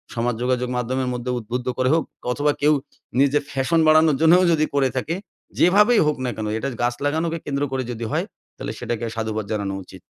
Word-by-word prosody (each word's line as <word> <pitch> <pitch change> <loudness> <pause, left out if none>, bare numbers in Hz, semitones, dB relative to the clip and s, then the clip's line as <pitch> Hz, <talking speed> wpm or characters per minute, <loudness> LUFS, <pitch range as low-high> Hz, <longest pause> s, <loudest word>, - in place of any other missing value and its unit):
সমাজ 120 0 0
যোগাযোগ 125 0 0
মাধ্যমের 125 +1 -1
মধ্যে 125 +1 -3
উদ্বুদ্ধ 120 +3 -5
করে 130 0 +2
হোক 165 - +2 0.3
অথবা 145 +3 +1
কেউ 150 +1 +5 0.5
নিজের 140 +1 +3
ফ্যাশন 135 +5 +1
বাড়ানোর 155 -2 +5
জন্যও 175 +3 +6
যদি 155 -2 +3
করে 135 -2 +3
থাকে? 155 +6 -1 0.4
যেভাবেই 210 +6 +5
হোক 150 - +1
না - - 0
কেন? 110 - -4
এটা 135 +5 -2
গাছ 120 0 +1
লাগানোকে 160 +3 0
কেন্দ্র 140 0 -1
করে 130 -1 -1
যদি 115 -1 -5
হয়? - - 0 0.3
তাহলে - - -5
সেটাকে 120 0 -3
সাধুবাদ 110 -2 -2
জানানো 100 -2 -2
উচিত। - - -14
130 Hz, 190 wpm, -22 LUFS, 120-155 Hz, 0.5 s, জন্যও